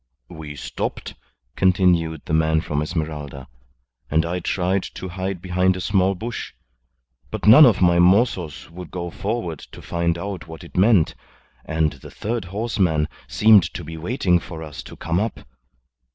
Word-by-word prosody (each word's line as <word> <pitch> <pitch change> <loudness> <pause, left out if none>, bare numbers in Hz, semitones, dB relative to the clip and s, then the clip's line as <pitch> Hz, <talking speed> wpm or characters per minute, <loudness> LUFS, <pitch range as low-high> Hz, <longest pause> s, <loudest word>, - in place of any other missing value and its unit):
"We 75 -2 -8
stopped," - - -5 0.4
continued 90 -4 +2
the - - -4
man 80 0 +3
from 75 -1 -2
Esmeralda, 75 -4 -4 0.6
"and 80 +2 +2
I 90 +2 -2
tried 95 +2 0
to 95 - -6
hide 95 0 -4
behind 90 0 +1
a - - -5
small 95 0 +1
bush. 115 +4 -6 0.8
But - - -5
none 130 +8 +10
of 105 -5 +2
my 85 -1 +4
mozos 90 - +2
would 90 0 -9
go 85 -1 -5
forward 100 -8 -3
to - - -13
find 85 0 -1
out 95 -3 -6
what 80 -1 -10
it - - -14
meant, 95 -3 +4 0.5
and 80 -2 0
the 70 - -12
third 115 -1 -4
horseman 95 -6 0 0.2
seemed 110 -2 +6
to 90 - -5
be 80 +2 -8
waiting 90 +1 +1
for 80 -1 -8
us 75 -2 -8
to - - -11
come 85 +2 -1
up. 110 +3 -3
90 Hz, 160 wpm, -22 LUFS, 80-95 Hz, 0.8 s, none